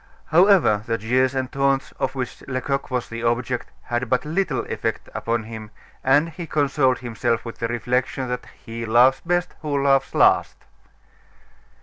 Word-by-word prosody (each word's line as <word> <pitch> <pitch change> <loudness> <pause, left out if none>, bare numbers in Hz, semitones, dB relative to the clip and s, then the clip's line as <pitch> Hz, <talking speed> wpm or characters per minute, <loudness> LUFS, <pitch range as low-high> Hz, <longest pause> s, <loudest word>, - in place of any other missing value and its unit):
However, 175 - +5
the 115 0 0
jeers 130 +5 +1
and 130 -1 -2
taunts 135 -1 +1
of 130 - -1
which 130 -2 -5
Lecoq 135 +1 -2
was 125 -2 -2
the 115 0 -6
object 120 +1 -1
had 120 0 -2
but 125 +1 +1
little 185 +6 -1
effect - - -3
upon 115 0 -1
him, 110 -1 -8 0.3
and 145 +5 +4
he 165 +1 -8
consoled 140 -4 +2
himself 115 -1 -2
with 115 - -8
the 115 - -1
reflection 125 +2 -1
that, 125 - -4 0.2
"He 115 +1 -6
laughs 120 +4 +4
best 175 +1 0
who 150 -2 -1
laughs 135 -1 +2
last." - - +4
130 Hz, 155 wpm, -23 LUFS, 120-140 Hz, 0.3 s, However